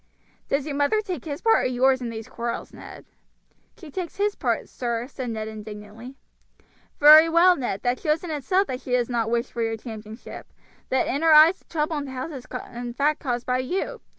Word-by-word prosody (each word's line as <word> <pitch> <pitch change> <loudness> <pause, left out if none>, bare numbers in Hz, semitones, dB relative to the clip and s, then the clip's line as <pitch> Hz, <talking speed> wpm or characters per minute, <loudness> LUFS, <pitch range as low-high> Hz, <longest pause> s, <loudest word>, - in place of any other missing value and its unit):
"Does 275 0 0
your 300 - -4
mother 285 +9 +2
take 365 - -6
his 290 -2 -6
part 450 0 +4
or - - +3
yours 260 +1 +2
in 240 - -3
these 225 0 -7
quarrels, 235 -2 -5
Ned?" - - -11 0.7
"She 320 -5 -12
takes 355 +2 -5
his 410 +1 0
part, - - -2
sir," 235 -2 -3
said 260 -2 -6
Ned 220 -1 -4
indignantly. 215 +3 -9 0.8
"Very 310 +2 +9
well, 350 +2 +5
Ned; 240 - -4
that 245 +1 0
shows 310 0 0
in 345 - -5
itself 365 +7 +1
that 255 -7 -5
she 250 - -5
does 245 -1 +1
not 230 -2 0
wish 235 +1 -1
for 235 - -4
your 225 0 -1
championship, 220 0 -10 0.4
that 260 -1 +1
in 280 - -2
her 325 -1 +5
eyes 320 +5 +7
the - - -31
trouble 310 -1 -2
in 285 - -5
the 270 - -8
house 260 +5 -5
is 265 -4 -9 0.3
in 240 0 -6
fact 295 +3 +1
caused 245 -3 -3
by 250 0 0
you. 380 - -3
260 Hz, 210 wpm, -24 LUFS, 235-310 Hz, 0.8 s, Very